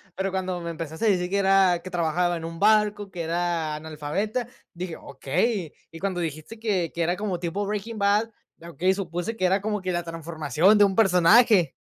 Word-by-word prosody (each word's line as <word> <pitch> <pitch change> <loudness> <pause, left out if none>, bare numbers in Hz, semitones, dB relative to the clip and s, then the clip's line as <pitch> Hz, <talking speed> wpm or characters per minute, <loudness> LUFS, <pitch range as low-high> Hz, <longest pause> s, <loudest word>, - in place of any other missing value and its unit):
pero 190 +1 -1
cuando 185 -1 -3
me 170 - -5
empezaste 165 +4 -5
a - - +4
decir 180 -2 +1
que 200 - +1
era, 190 -3 +4
que 185 - -8
trabajaba 175 0 0
en 165 - -8
un 165 0 -7
barco, 210 -1 +3
que 175 -3 -5
era 165 -1 -1
analfabeta, 160 +10 -3 0.3
dije: 175 -1 -6
"Okey". 155 - -2 0.2
Y 165 - -10
cuando 190 -2 -2
dijiste 160 +6 -5
que 195 -7 -1
que 170 - -3
era 175 +2 0
como 200 -4 -3
tipo 180 +4 -3
Breaking 210 +2 -4
Bad, 205 +2 +2 0.3
okey, 170 +3 0
supuse 180 +2 -4
que 185 - -1
era 190 +2 +3
como 210 -1 -2
que 185 - -2
la 175 -1 -1
transformación 165 - +1
de 205 - +6
un 195 -1 +2
personaje. 195 0 +5
180 Hz, 200 wpm, -25 LUFS, 165-200 Hz, 0.3 s, de